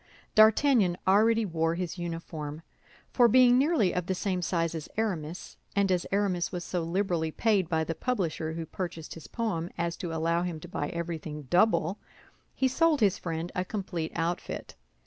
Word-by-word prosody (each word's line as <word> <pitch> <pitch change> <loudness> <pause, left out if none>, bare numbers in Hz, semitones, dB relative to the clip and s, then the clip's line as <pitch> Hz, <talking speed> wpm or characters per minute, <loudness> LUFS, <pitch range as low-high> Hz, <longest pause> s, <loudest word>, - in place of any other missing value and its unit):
D'Artagnan 220 -3 +5
already 220 +3 +4
wore 165 -2 0
his 180 0 -4
uniform—for 165 - -2
being 250 +1 +6
nearly 280 - +2
of 180 -1 -2
the 190 - 0
same 185 -1 -1
size 165 -1 0
as 160 -2 -6
Aramis, 180 -7 -3 0.2
and 200 -1 +2
as 180 -1 0
Aramis 195 -3 0
was 175 -1 -4
so 175 0 -2
liberally 170 -1 0
paid 195 0 +1
by 160 -1 +1
the 165 - -2
publisher 165 - -2
who 165 0 -4
purchased 165 -2 -6
his 165 - -10
poem 200 -8 -2
as 170 0 -1
to 175 - -4
allow 165 +1 +1
him 175 -3 -3
to - - -9
buy 145 - -3
everything 160 -3 -5
double, 180 - +2 0.6
he 265 - +2
sold 315 +3 +3
his 205 -4 +3
friend 165 0 -4
a 180 - -1
complete 180 -5 -4
outfit. 170 +1 -3
175 Hz, 165 wpm, -29 LUFS, 165-205 Hz, 0.6 s, being